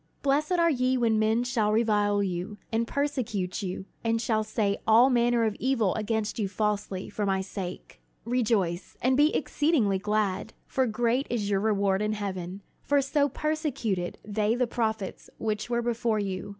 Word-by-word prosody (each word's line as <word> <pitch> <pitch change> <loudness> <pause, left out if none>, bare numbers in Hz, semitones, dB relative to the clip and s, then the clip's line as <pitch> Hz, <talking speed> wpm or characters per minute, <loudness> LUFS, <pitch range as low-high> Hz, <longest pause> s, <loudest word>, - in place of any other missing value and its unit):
"Blessed 290 +5 +2
are 335 -1 +4
ye 255 -1 +1
when 225 -3 +2
men 220 +2 +2
shall 235 -4 +1
revile 210 -2 +2
you, 185 +2 -3
and 230 +1 0
persecute 235 -12 -2
you, 190 0 -4 0.2
and 230 0 +1
shall 220 -1 +1
say 210 -2 -1
all 235 +4 +6
manner 240 -1 +3
of 215 -2 0
evil 230 -7 +1
against 220 0 -2
you 205 - +1
falsely, 205 -2 -2
for 210 - -4
my 195 -1 +1
sake. 190 -1 -7 0.2
"Rejoice, 215 -8 0
and 255 +1 +2
be 295 +3 +4
exceedingly 285 - +1
glad: 210 0 -1
for 260 -1 0
great 240 +4 0
is 210 -4 -1
your 195 - +2
reward 200 -2 +1
in 210 0 0
heaven: 190 -2 -5 0.2
for 285 0 +2
so 285 +1 +1
persecuted 275 - -2
they 215 +1 +1
the 250 0 +2
prophets 220 -4 -3
which 215 0 -2
were 235 0 0
before 230 -1 0
you. 195 -2 -3
220 Hz, 165 wpm, -27 LUFS, 200-245 Hz, 0.2 s, all